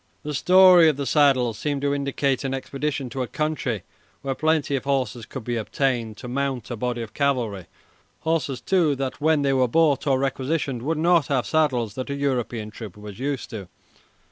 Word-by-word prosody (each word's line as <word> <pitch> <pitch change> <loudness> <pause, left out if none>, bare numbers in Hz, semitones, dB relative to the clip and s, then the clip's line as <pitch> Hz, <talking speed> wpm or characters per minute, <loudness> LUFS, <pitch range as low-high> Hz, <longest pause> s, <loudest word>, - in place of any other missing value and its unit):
The 150 - -4
story 180 +1 +7
of 150 - -1
the 140 - -2
saddles 130 -7 +3
seemed 145 0 -2
to 140 0 +1
indicate 140 -1 -1
an 135 -1 -1
expedition 140 +1 -3
to 130 - -3
a 125 - -2
country 150 - -2 0.4
where 135 -1 -1
plenty 155 -1 +1
of 135 - -3
horses 125 -5 -1
could 130 - -7
be 120 +1 -2
obtained 115 -1 -1
to 125 - -8
mount 130 -2 -2
a - - -2
body 120 +1 -2
of 110 - -10
cavalry 120 -10 -1 0.5
horses, 155 -6 -1
too, 165 -3 +2
that 135 0 -4
when 155 -1 +3
they 135 -1 +2
were 130 -1 +3
bought 150 +1 +2
or 135 -2 +3
requisitioned 135 -1 -1
would 155 +5 -1
not 170 -1 +3
have 135 -4 0
saddles 130 -9 +1
that 130 +2 -5
a 140 - -2
European 120 -6 -2
trooper 105 -3 -9
was 105 0 -10
used 140 0 -3
to. 100 -6 -7
135 Hz, 195 wpm, -24 LUFS, 120-145 Hz, 0.5 s, story